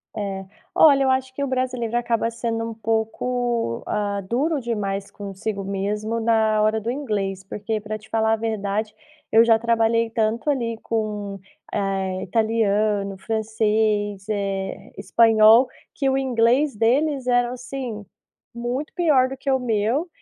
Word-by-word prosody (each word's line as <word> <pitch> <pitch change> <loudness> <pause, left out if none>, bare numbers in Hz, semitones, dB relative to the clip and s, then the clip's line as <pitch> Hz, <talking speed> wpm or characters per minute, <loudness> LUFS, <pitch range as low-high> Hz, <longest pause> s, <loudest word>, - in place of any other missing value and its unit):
É, 195 -2 -4 0.3
olha, 280 -3 +6
eu 265 - +2
acho 260 0 0
que 280 - -3
o - - -1
brasileiro 255 -3 -1
acaba 235 -1 0
sendo 230 -1 -3
um - - -6
pouco, 225 - -1
ah, 205 -1 -1
duro 275 - -1
demais 200 -4 -3
consigo 200 0 -5
mesmo 210 +3 -2
na 220 -1 +2
hora 215 +1 +2
do 225 +2 -3
inglês, 205 -8 -3
porque 210 +3 -3
pra 215 +1 -4
te 220 +1 -18
falar 220 0 +2
a - - +4
verdade, 215 -1 -2 0.4
eu 225 +1 +7
já 230 -1 +5
trabalhei 230 0 +1
tanto 225 +5 0
ali 235 -5 -2
com, 210 -3 -3 0.3
eh, 195 -2 -1
italiano, 210 -1 +1
francês, 215 -1 0
eh, 195 -2 -3
espanhol, 225 +3 +6 0.3
que 275 - 0
o 265 - +2
inglês 255 +2 +2
deles 265 +5 +1
era 245 -1 +2
assim, 245 -4 -6 0.5
muito 245 +5 -4
pior 295 -7 +3
do 270 - -5
que 275 +1 -5
o 265 - +4
meu, 240 - 0
225 Hz, 145 wpm, -23 LUFS, 210-245 Hz, 0.5 s, eu